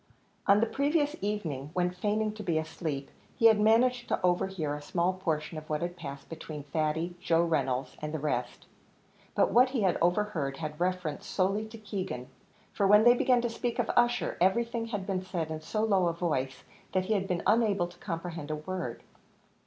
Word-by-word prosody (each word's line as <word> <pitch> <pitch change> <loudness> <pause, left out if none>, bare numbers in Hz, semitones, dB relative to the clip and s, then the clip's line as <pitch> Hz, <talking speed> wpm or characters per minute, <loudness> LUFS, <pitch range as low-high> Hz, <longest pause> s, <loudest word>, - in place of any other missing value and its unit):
On 200 +1 +6
the - - +4
previous 290 +4 +1
evening, 165 -10 -3
when 180 0 +1
feigning 210 +3 -1
to 215 - -8
be 170 -6 0
asleep, 155 -3 -4 0.3
he 230 - +2
had 220 -2 +7
managed 240 +3 +3
to - - 0
overhear 175 -4 0
a 150 - -5
small 170 +4 0
portion 160 -4 -2
of 155 - -16
what 150 +1 -1
had 175 0 -3
passed 140 -5 -8
between 155 -2 -7
Thady, 155 +3 -1
Joe 165 -1 +3
Reynolds, 135 -6 0
and 150 0 -3
the 160 - -2
rest; 125 -5 -2 0.7
but - - +3
what 250 +4 +6
he 255 -5 -1
had 185 -2 +2
overheard 175 -6 +1
had 155 -1 -5
reference 180 -4 -2
solely 200 +3 0
to 225 +1 -10
Keegan; 190 - -5 0.4
for 200 - +2
when 210 +2 +7
they 240 +1 +8
began 250 0 +3
to 240 - -1
speak 235 +1 -3
of 240 -2 +1
Ussher, 240 0 +2
everything 230 +5 +2
had 205 -4 -3
been 190 -2 -1
said 170 -4 -3
in 155 0 -4
so 215 +7 -2
low 195 -5 +3
a 170 - +1
voice, 150 -6 -2 0.3
that 185 0 +1
he 220 - +1
had 195 -2 0
been 180 -2 -1
unable 210 -5 +3
to 175 0 -12
comprehend 165 -4 -5
a 155 - -1
word. 155 -4 -5
180 Hz, 195 wpm, -30 LUFS, 155-215 Hz, 0.7 s, they